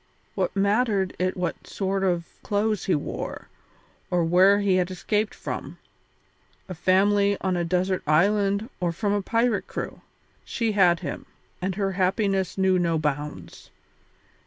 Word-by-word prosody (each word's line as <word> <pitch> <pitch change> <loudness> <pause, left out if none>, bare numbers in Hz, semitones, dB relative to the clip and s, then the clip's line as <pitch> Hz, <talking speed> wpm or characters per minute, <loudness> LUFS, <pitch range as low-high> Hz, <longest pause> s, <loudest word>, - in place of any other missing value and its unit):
What - - -2
mattered 200 -1 +1
it 185 +1 0
what 180 -1 -3
sort 195 0 -2
of 175 -3 +1 0.2
clothes 210 -1 0
he 185 - +2
wore, 145 - -5 0.6
or 175 -1 +1
where 185 +4 +5
he 195 -2 +2
had 180 0 +1
escaped 210 +3 -1
from - - -6 0.9
a 185 - -5
family 200 +3 +3
on 190 -1 0
a 175 - 0
desert 180 +2 0
island 200 +6 +2
or 175 -2 0
from 200 +4 -1
a 205 - +1
pirate 230 +2 0
crew? - - -6 0.4
She 230 -2 -1
had 180 -4 +4
him, 150 -6 -6 0.3
and 190 0 -2
her 195 -1 -1
happiness 190 0 0
knew 190 -1 +3
no 170 -2 +1
bounds. 150 -1 -4
190 Hz, 145 wpm, -25 LUFS, 180-205 Hz, 0.9 s, where